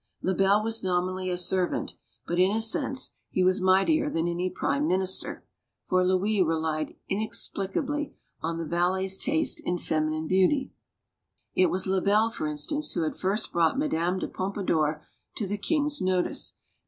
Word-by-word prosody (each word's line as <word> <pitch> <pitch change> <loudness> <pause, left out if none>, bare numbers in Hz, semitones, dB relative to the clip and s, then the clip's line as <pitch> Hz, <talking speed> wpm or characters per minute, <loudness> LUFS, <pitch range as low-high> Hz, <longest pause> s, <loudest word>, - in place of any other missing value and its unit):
( - - -51
Lebel 195 +3 +3
was 225 -1 0
nominally 185 0 -1
a 180 - -1
servant, 180 0 +2 0.3
but, 175 +1 -2
in 185 +1 +5
a 215 +2 0
sense, 225 +4 0 0.2
he 185 - +1
v - - +4
as 185 +1 0
mightier 195 - +3
than 165 - -1
any 175 +2 -1
prime 280 +9 -1
minister. 190 0 0 0.4
For 185 0 +2
Louis 190 +3 +2
relied 160 -2 -1 0.2
haplicitly 220 +7 -2 0.3
on 165 +1 -2
the 165 - -3
valet's 185 +3 0
taste 315 +2 +1
in 180 - -1
feminine 155 -1 -1
beauty. 190 - +2 0.8
It 185 - +4
was 185 0 -1
Lebel, 200 +4 +2
for 190 -9 -3
instance, 290 - 0
who 170 - 0
had 155 - -2
first 195 +4 -1
brought 170 +7 +2
Madame 185 - 0
d': - - -2
Pompadour 165 -6 -1 0.3
to 215 - -2
the 205 +1 -3
king's 295 +2 +1
notice. 185 -1 -1
185 Hz, 160 wpm, -27 LUFS, 175-215 Hz, 0.8 s, in